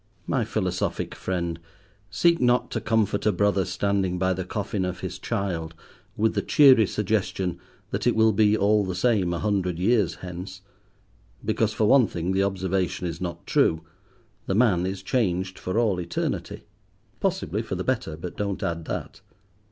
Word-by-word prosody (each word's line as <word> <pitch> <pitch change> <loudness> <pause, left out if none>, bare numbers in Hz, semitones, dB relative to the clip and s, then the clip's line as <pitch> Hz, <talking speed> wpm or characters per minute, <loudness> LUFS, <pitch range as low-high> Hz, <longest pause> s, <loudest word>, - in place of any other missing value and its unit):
My 125 -5 0
philosophic 95 -4 -2
friend, 85 -3 -3 0.5
seek 170 - +2
not 125 0 +2
to - - -2
comfort 110 -2 +1
a - - +5
brother 100 0 +1
standing 95 -1 0
by 95 +1 +1
the 95 +1 -3
coffin 100 +1 -3
of 90 0 -4
his 95 0 -5
child 90 -7 -3 0.4
with 110 +1 +2
the - - 0
cheery 130 -8 +6
suggestion 95 -4 -1 0.3
that 100 +4 -1
it 120 - +3
will 110 0 +4
be 105 +1 +4
all 105 +1 +3
the 95 -2 -3
same 100 -3 +2
a 85 - -1
hundred 95 -3 0
years 105 0 +2
hence, 90 +1 -8 0.8
because, - - +1
for 110 - +1
one 130 +1 +5
thing, 85 +1 -3
the 95 +1 +2
observation 95 -2 -1
is 85 0 -4
not 85 -2 -5
true: 80 0 +2 0.6
the 95 - 0
man 100 -6 +3
is 95 0 -5
changed 95 -5 -1
for 95 +4 -3
all 110 -6 +2
eternity—possibly 85 - -4
for - - -4
the - - -3
better, 80 - -2
but 85 +2 -7
don't 100 -2 -3
add 85 -1 -2
that. - - -5
95 Hz, 165 wpm, -25 LUFS, 90-110 Hz, 0.8 s, cheery